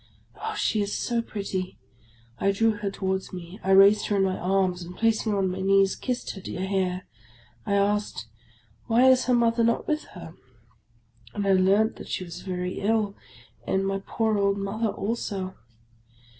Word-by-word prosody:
Oh, 440 Hz, 0 st, -5 dB
she 220 Hz, -, +1 dB
is 205 Hz, 0 st, -2 dB
so 235 Hz, -1 st, 0 dB
pretty! 195 Hz, -4 st, -4 dB, 0.6 s
I 195 Hz, -, +2 dB
drew 225 Hz, +3 st, +3 dB
her 205 Hz, -1 st, -3 dB
towards 190 Hz, -1 st, -3 dB
me; 180 Hz, +2 st, -9 dB
I 190 Hz, -, -3 dB
raised 195 Hz, +2 st, +6 dB
her 205 Hz, -, 0 dB
in 195 Hz, -, +3 dB
my 190 Hz, -1 st, +1 dB
arms, 185 Hz, -1 st, 0 dB
and 175 Hz, +1 st, -9 dB
placing 225 Hz, -1 st, +1 dB
her 205 Hz, -, 0 dB
on 190 Hz, -2 st, +1 dB
my 185 Hz, +1 st, -4 dB
knees, 195 Hz, 0 st, +3 dB
kissed 250 Hz, -2 st, -3 dB
her 195 Hz, -, -9 dB
dear 185 Hz, +1 st, -4 dB
hair. 185 Hz, -2 st, -1 dB, 0.6 s
I 200 Hz, -, +1 dB
asked, 205 Hz, -, 0 dB, 0.3 s
" 110 Hz, -2 st, -34 dB
Why 240 Hz, +3 st, +5 dB
is 255 Hz, 0 st, +3 dB
her 250 Hz, -, +3 dB
Mother 230 Hz, 0 st, +3 dB
not 230 Hz, 0 st, +1 dB
with 305 Hz, 0 st, -1 dB
her? 170 Hz, -2 st, -9 dB, 0.5 s
" 115 Hz, 0 st, -28 dB
And 205 Hz, -1 st, -2 dB
I 195 Hz, -, +4 dB
learnt 195 Hz, +4 st, +3 dB
that -, -, -10 dB
she -, -, -2 dB
was 175 Hz, 0 st, -8 dB
very 180 Hz, -1 st, -4 dB
ill, 210 Hz, -1 st, 0 dB, 0.5 s
and 190 Hz, 0 st, +1 dB
my 195 Hz, 0 st, -1 dB
poor 220 Hz, -1 st, 0 dB
old 200 Hz, 0 st, +2 dB
mother 200 Hz, +3 st, -2 dB
also. 200 Hz, -2 st, -3 dB
195 Hz, 185 wpm, -26 LUFS, 185-220 Hz, 0.6 s, raised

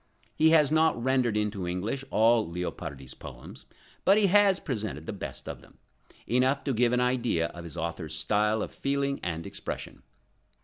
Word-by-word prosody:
He 160 Hz, -, +4 dB
has 155 Hz, -3 st, +5 dB
not 160 Hz, -4 st, +3 dB
rendered 125 Hz, -3 st, +1 dB
into 105 Hz, -4 st, -2 dB
English 100 Hz, +10 st, -2 dB
all 115 Hz, +1 st, +4 dB
Leopardi's 80 Hz, -6 st, -5 dB
poems, -, -, -11 dB, 0.4 s
but 195 Hz, -, +5 dB
he 215 Hz, -, +4 dB
has 200 Hz, 0 st, +5 dB
presented 105 Hz, -, -4 dB
the -, -, -4 dB
best 100 Hz, -, -7 dB
of -, -, -6 dB
them, -, -, -20 dB, 0.5 s
enough 130 Hz, +3 st, +2 dB
to 135 Hz, -, -1 dB
give 120 Hz, +1 st, +3 dB
an 125 Hz, -, +2 dB
idea 125 Hz, -9 st, +1 dB
of 85 Hz, -, -10 dB
his 80 Hz, -, -9 dB
author's 80 Hz, -1 st, -4 dB
style 105 Hz, +5 st, +1 dB
of -, -, -6 dB
feeling 140 Hz, 0 st, -1 dB
and 85 Hz, -2 st, -4 dB
expression. -, -, -6 dB
115 Hz, 170 wpm, -28 LUFS, 90-140 Hz, 0.5 s, has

